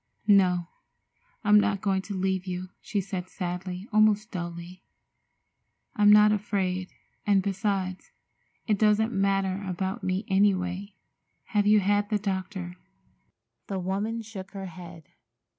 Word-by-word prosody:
"No, 185 -4 +4 0.8
I'm 210 0 +6
not 205 -1 +1
going 195 -1 0
to 200 - -3
leave 190 0 -1
you," 180 0 -4
she 205 - -2
said 185 -1 -5
sadly, 180 +1 -5
almost 215 0 +3
dully. 175 0 -6 1.1
"I'm 205 0 +6
not 210 0 +7
afraid, 190 -3 -1 0.4
and, 200 -2 +4
besides, 195 -2 -2 0.5
it 210 -3 +1
doesn't 215 +1 +3
matter 195 0 0
about 190 +3 -3
me, 185 +2 -1
any 195 +1 +4
way. 185 +2 -5 0.5
Have 205 -2 +2
you 210 0 +6
had 205 +1 +1
the 215 - +2
doctor?" 190 -2 -4 0.9
The 195 - -3
woman 200 +5 -2
shook 205 -3 -9
her 195 -1 -6
head. 170 -2 -10
195 Hz, 130 wpm, -27 LUFS, 185-205 Hz, 1.1 s, not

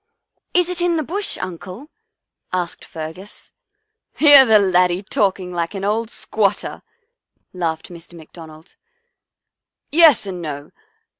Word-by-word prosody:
" - - -52
Is 360 -1 +3
it 360 -1 -3
in 345 -1 +1
the 310 - -1
Bush, 390 +8 -4
Uncle? 185 - -8 0.3
" - - -65 0.2
asked 180 -2 -3
Fergus. 160 +5 -10 0.3
" 435 +1 -54
Hear 290 -3 +8
the 220 -1 +6
laddie 180 -1 +2
talking 190 -2 -1
like 170 +3 -3
an 195 0 -4
old 220 +2 -1
squat 210 -3 0
ter," - - -8 0.7
laughed 165 -3 -4
Mr. 170 -1 -13
McDonald. 160 0 -14 0.6
" - - -66 0.3
Yes 310 -8 +5
and 185 -3 -6
no. 145 -3 -7
190 Hz, 145 wpm, -19 LUFS, 170-270 Hz, 0.7 s, Hear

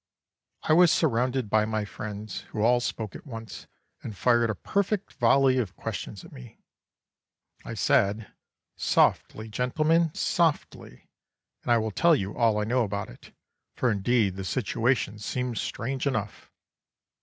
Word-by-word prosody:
"I - - +2
was 175 0 +6
surrounded 130 -4 +1
by 110 +1 +3
my 110 -1 -2
friends, 105 -1 -7
who 105 - -2
all 120 +2 +4
spoke 110 -4 -4
at - - -11
once, 115 -4 -9 0.3
and 110 -4 -8
fired 120 0 +3
a 110 - -1
perfect 200 - -2
volley 130 +2 +3
of 95 -7 -3
questions - - -6
at - - -14
me. 60 -1 -12 1.1
I - - -7
said, 105 +2 +1 0.4
'Softly, 110 +1 +1
gentlemen, 155 +8 +1
softly, 160 - -1 0.5
and - - -2
I 120 - +6
will 110 -1 -1
tell 170 - +4
you 100 -6 -4
all 115 -3 +2
I - - 0
know 120 +3 +1
about 100 - -4
it, - - -16 0.4
for 125 - +1
indeed 100 -1 +1
the 95 - -4
situation 110 0 -1
seems 125 +1 -3
strange 135 +4 -3
enough. 110 -6 -3
115 Hz, 145 wpm, -27 LUFS, 105-130 Hz, 1.1 s, was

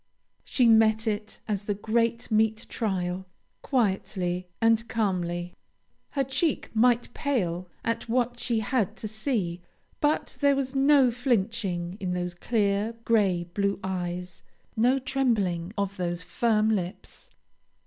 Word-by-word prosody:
She 250 -3 +3
met 220 0 +5
it 210 0 -3
as 205 -2 -2
the 205 - -1
great 230 +3 0
meet 220 0 +2
trial, 190 -4 -2 0.3
quietly 190 -7 0
and 225 0 +3
calmly. 180 -6 -1 0.6
Her 275 - +1
cheek 270 +4 0
might 240 +1 +3
pale 185 - -1 0.2
at 230 0 -2
what 245 0 0
she 235 -3 0
had 220 -2 0
to 215 - -4
see, 215 -6 -2 0.4
but 295 +1 0
there 280 -1 +5
was 270 -1 -2
no 270 -2 +5
flinching 210 -7 -1
in 185 -3 -2
those 180 0 -2
clear, 205 +2 0
gray 195 -6 +3
blue 200 0 0
eyes, 180 -1 -4 0.3
no 245 +4 +3
trembling 225 -10 0
of 200 0 -2
those 175 -1 -2
firm 220 +3 +2
lips. 190 - -4
215 Hz, 130 wpm, -27 LUFS, 185-240 Hz, 0.6 s, met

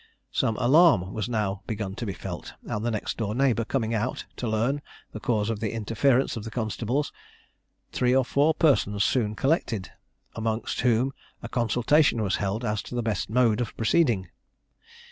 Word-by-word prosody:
Some 110 - +1
alarm 125 - +4
was 110 +2 -3
now 105 -4 -1
begun 105 -4 -3
to 115 - -4
be 100 - -2
felt, - - -7
and 105 - -3
the 120 - 0
next 110 -3 -3
door 105 -2 -2
neighbour 125 -3 +2
coming 115 -1 -1
out, 115 +3 -2
to 120 - -3
learn 115 +6 0 0.3
the 110 - -7
cause 110 -1 0
of 110 - -3
the 110 -1 -2
interference 115 +4 +1
of 115 - -5
the 115 - -6
constables, 120 +5 -2 0.8
three 125 0 +2
or 135 -1 +3
four 145 +4 +2
persons 105 - +3
soon 110 -5 +1
collected, 130 - 0 0.4
amongst 110 0 -2
whom 125 +2 +2 0.3
a - - -4
consultation 120 +2 +2
was 100 - 0
held 105 +4 -2
as 105 -1 -1
to - - -8
the 120 - -1
best 110 -4 -2
mode 115 -1 +3
of 120 - -5
proceeding. 115 - +2
115 Hz, 175 wpm, -26 LUFS, 105-125 Hz, 0.8 s, alarm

